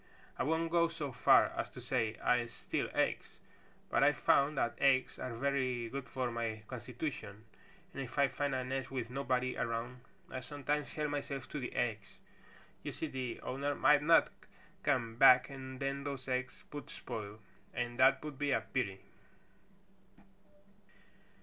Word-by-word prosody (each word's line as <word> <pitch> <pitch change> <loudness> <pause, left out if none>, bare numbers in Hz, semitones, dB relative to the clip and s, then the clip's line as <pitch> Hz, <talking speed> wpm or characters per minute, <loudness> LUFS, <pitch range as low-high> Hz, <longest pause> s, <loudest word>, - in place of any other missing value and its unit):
"I - - -3
won't 160 +3 0
go 170 0 +4
so 155 -4 -4
far - - +5
as - - -2
to - - -11
say 110 -1 0
I 120 -1 +3
steal 120 - -3
eggs, - - -1 0.5
but - - +4
I've - - +4
found 140 +1 +3
that 120 -3 +1
eggs 135 -1 +3
are 125 -2 -4
very 130 -2 0
good 135 +1 -5
for 130 -2 -2
my 115 -2 -3
constitution 120 -4 -6 0.5
and 140 - -4
if 130 0 -7
I 140 -1 +5
find 140 0 -1
a 130 - -1
nest 130 +1 -3
with 125 -3 -4
nobody 130 -1 0
around 115 +2 -3 0.3
I 130 - -3
sometimes 145 +2 -2
help 150 -1 -1
myself 140 -2 -3
to 150 - -4
the 125 - -5
eggs. 105 -5 -2 0.6
You - - -4
see - - -4
the 130 -3 -4
owner 140 +2 -2
might 150 +1 +5
not 165 +2 +5 0.5
come 115 -1 0
back 125 0 +7
and 130 -1 -8
then 140 0 -2
those 140 -2 -5
eggs 130 0 -2
would 145 - -6
spoil, 105 -1 -6 0.3
and 120 0 -3
that 135 +2 +5
would 150 -3 -7
be 145 -1 0
a 125 - +2
pity." 110 -4 -2
130 Hz, 160 wpm, -34 LUFS, 120-140 Hz, 0.6 s, back